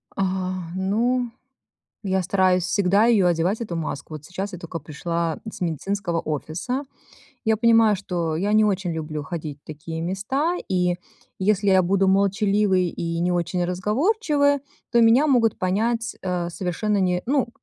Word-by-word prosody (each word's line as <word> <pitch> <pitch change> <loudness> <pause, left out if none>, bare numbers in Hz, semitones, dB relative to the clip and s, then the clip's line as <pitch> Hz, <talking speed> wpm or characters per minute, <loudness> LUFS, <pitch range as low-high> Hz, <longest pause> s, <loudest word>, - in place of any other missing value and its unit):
А, 185 -2 -2
ну, 230 +6 0 0.7
я 190 -1 0
стараюсь 185 0 +2
всегда 200 +3 +3
ее 215 -6 +4
одевать, 175 +5 +1
эту 210 -7 -4
маску. 155 -1 -5
Вот 150 -1 -8
сейчас 190 +4 -5
я 180 - -6
только 170 -1 -6
пришла 165 +2 -3
с - - -11
медицинского 175 +1 -2
офиса. 165 - -3 0.6
Я 220 -1 +3
понимаю, 225 -2 +4
что 175 -5 -2
я 200 +5 0
не 215 0 +5
очень 190 -4 0
люблю 155 -1 -4
ходить 150 -2 -6
в - - -62
такие 160 +2 -6
места, 240 - -1
и 180 -1 +1 0.4
если 200 +1 +1
я 190 -1 +5
буду 195 +2 +2
молчаливой 200 -1 +2
и 165 0 -3
не 180 +1 +1
очень 175 +1 0
разговорчивой, 285 - +1 0.3
то 235 - +5
меня 230 +6 +5
могут 240 -6 +3
понять, 225 +5 0
э, 180 -2 -1
совершенно 190 +4 -1
не 180 -2 +1
ну, 270 -1 +1
190 Hz, 155 wpm, -23 LUFS, 175-215 Hz, 0.7 s, не